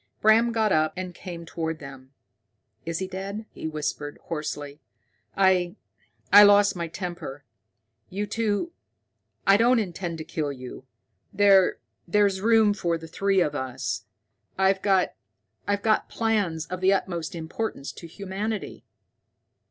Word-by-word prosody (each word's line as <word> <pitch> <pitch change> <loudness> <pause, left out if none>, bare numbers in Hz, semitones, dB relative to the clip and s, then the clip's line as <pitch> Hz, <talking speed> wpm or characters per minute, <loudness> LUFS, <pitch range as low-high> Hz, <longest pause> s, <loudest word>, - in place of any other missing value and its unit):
Bram 225 +2 +5
got 220 -2 +1
up 155 -1 +2
and 185 -1 -5
came 170 -2 -8
toward 160 -1 -3
them. 135 -3 -11 0.8
"Is 165 -1 -1
he 190 - -3
dead?" 195 +3 -5
he - - -6
whispered 150 -1 -4
hoarsely. 150 -2 -5 0.6
"I 185 -2 +3 0.6
I 205 - +11
lost 205 -1 +6
my 170 -1 -3
temper. 165 -5 -6 0.7
You 200 +3 -3
two 220 +8 -1 0.7
I 195 +1 +6
don't 240 +3 +4
intend 175 -5 -3
to 160 - -5
kill 150 -2 -3
you. 130 -1 -9 0.5
There 195 -2 +5 0.3
there's 200 0 +2
room 220 -1 +5
for 170 -4 -1
the 165 0 -10
three 195 +3 +1
of 150 -4 +1
us. 130 -2 -3 0.5
I've 190 0 +3
got 195 -2 +2 1.0
plans 205 -8 0
of 185 0 -6
the 190 +1 +5
utmost 175 -4 -2
importance 165 -2 -4
to 170 - -11
humanity." 200 +4 -5
185 Hz, 130 wpm, -26 LUFS, 160-205 Hz, 1.0 s, I